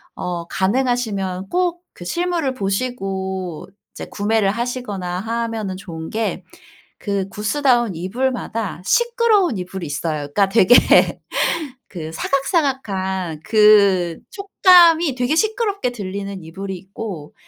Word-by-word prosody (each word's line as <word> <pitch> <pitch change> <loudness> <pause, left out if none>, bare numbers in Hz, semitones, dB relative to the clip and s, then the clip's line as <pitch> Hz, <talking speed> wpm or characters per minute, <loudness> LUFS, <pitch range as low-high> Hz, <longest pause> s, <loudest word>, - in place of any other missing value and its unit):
어 175 -1 -4
가능하시면 200 -3 -1
꼭 355 -1 0
그 175 - -10
실물을 340 - -1
보시고 195 -5 -3 0.2
이제 - - -8
구매를 205 -1 +1
하시거나 210 -6 -3
하면은 225 -3 -3
좋은 165 -4 -8
게 225 +1 -2 0.6
그 200 -2 -2
구스다운 240 +1 +1
이불마다 220 0 -3
시끄러운 465 - +2
이불이 185 -1 -5
있어요. 150 +2 -2 0.2
그러니까 200 -1 +3
되게 215 +3 +5 0.7
그 160 -4 -7
사각사각한 195 - -1
그 200 -6 +4
촉감이 350 - +5
되게 250 +4 0
시끄럽게 425 - 0
들리는 200 -4 -6
이불이 190 +4 -6
있고 190 -4 -8
210 Hz, 270 characters per minute, -20 LUFS, 190-260 Hz, 0.7 s, 되게